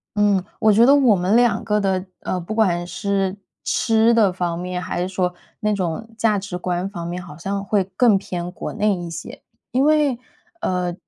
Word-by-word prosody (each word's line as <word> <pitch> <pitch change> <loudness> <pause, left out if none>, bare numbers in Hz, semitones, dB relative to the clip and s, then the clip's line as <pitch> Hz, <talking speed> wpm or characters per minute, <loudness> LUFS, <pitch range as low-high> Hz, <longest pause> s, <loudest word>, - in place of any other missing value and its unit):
嗯， 205 -3 +3 0.2
我 220 - +5
觉 225 +3 +6
得 275 +3 +7
我 260 -7 +5
们 185 +3 +1
2 240 -1 +3
个 210 -1 +1
的 190 -2 0 0.2
呃， 185 - -2
不 180 +5 -5
管 175 -6 +2
是 195 +2 -1 0.3
吃 225 0 +3
的 210 -5 +4
方 175 -2 -2
面， 180 0 -4
还 175 - -3
是 180 - -1
说 180 -1 -1 0.3
那 210 -1 +1
种 195 +3 -3
价 215 -2 +2
值 190 -2 -5
观 180 +1 -2
方 175 -4 -6
面， 175 +1 -4
好 180 - -11
像 195 +3 -3
会 200 -1 +1
更 225 -2 +5
偏 180 -2 -5
国 - - -6
内 210 -1 +1
一 175 -1 -6
些。 165 0 -8 0.3
因 260 +3 +2
为， 300 -4 +3 0.4
呃， 180 -1 -1
195 Hz, 205 characters per minute, -21 LUFS, 180-215 Hz, 0.4 s, 得